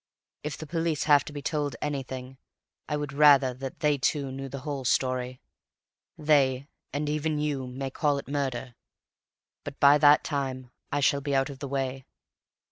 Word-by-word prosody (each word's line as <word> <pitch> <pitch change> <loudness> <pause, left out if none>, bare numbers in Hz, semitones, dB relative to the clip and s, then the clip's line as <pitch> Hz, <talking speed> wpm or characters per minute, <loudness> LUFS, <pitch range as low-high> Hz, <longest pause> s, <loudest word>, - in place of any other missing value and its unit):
If 150 -1 -5
the 155 - -7
police 165 -1 -1
have 145 -2 +5
to - - -7
be 145 -1 -7
told 145 -4 -1
anything, 135 -2 -5 0.5
I 150 - 0
would 145 -1 -4
rather 140 -3 +6
that 135 +1 -8
they 150 -2 +2
too 140 +1 0
knew 135 +1 -6
the 135 0 -6
whole 140 -1 -4
story. 130 0 0 0.8
They, 140 -3 +2 0.2
and 145 +2 -2
even 150 +1 -1
you, 145 -3 -2
may 135 +1 -5
call 145 0 +1
it 140 - -7
murder, 135 -3 -3 0.9
but 140 - -8
by 145 +1 +7
that 145 0 +6
time 130 -4 -3 0.2
I 145 - 0
shall 140 +1 +3
be 140 0 -1
out 135 +1 +1
of 135 - -11
the 140 - -5
way. 135 -1 -3
140 Hz, 175 wpm, -27 LUFS, 130-150 Hz, 0.9 s, by